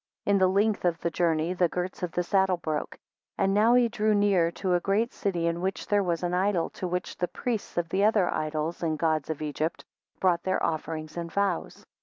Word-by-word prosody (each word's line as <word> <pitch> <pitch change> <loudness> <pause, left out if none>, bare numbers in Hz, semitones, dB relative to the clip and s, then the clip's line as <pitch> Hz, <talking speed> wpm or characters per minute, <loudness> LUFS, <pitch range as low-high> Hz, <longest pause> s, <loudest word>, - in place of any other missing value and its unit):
5 - - +2
In 200 - +5
the 185 - +5
length 200 +3 +1
of 175 -2 +1
the 170 - -1
journey 165 0 +1
the 180 -2 +2
girts 180 +3 -4
of 180 -2 -2
the 180 - 0
saddle 190 0 +2
broke. 155 -3 -3
6 - - -31 0.4
And 195 - +2
now 220 +4 +5
he 245 -1 +5
drew 215 -2 +1
near 200 -5 +3
to 185 -2 -1
a 175 - +3
great 205 +6 0
city, 175 -4 -1
in 170 +1 -1
which 190 +1 -2
there 205 -1 +2
was 175 -2 -1
an 175 0 -1
idol, 185 -2 +1
to 185 - -5
which 180 +1 -3
the 180 - 0
priests 230 -3 -4
of 175 -1 0
the 190 +3 +1
other 210 -4 +4
idols 155 +1 -2
and 160 -2 0
gods 155 -2 0
of 155 -1 -3
Egypt 155 +2 -3 0.3
brought 175 -2 +2
their 185 - -1
offerings 155 0 -4
and 170 -1 -4
vows. 200 -2 -2
180 Hz, 230 wpm, -27 LUFS, 165-200 Hz, 0.4 s, In